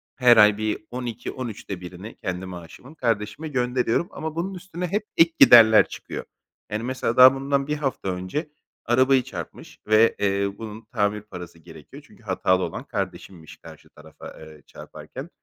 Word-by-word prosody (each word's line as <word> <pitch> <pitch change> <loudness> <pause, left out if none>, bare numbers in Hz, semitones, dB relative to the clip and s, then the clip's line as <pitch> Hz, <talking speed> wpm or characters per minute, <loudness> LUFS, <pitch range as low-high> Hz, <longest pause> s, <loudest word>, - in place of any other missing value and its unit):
her 120 -3 +5
ay 105 -1 +6
bir 110 0 -3
12-13'te 120 -5 -6
1'ni 90 +5 -10
kendi 95 -1 -5
maaşımın 90 - -11
kardeşime 115 +4 -2
gönderiyorum 125 +2 0
ama 155 0 -6
bunun 185 +4 -3
üstüne 180 -1 -6
hep 205 +4 -2
ek 165 0 +5
giderler 110 -2 +8
çıkıyor. - - -8 0.5
Yani 110 +2 -3
mesela 130 -2 -2
daha 130 +1 +9
bundan 140 +1 -1
1 150 0 -2
hafta 135 -9 -3
önce 95 - -4 0.4
arabayı 130 +2 +3
çarpmış 90 - -9
ve, 110 +1 +4
eee, 100 0 -1
bunun 110 0 -9
tamir 105 -3 0
parası 90 -5 -11
gerekiyor. 80 -3 -14
Çünkü - - -21
hatalı 95 0 +1
olan - - -5
kardeşimmiş 85 -5 -7
karşı - - -15
tarafa, 75 +1 -13
eee, 80 -1 -13
çarparken. - - -10
115 Hz, 150 wpm, -23 LUFS, 95-130 Hz, 0.5 s, daha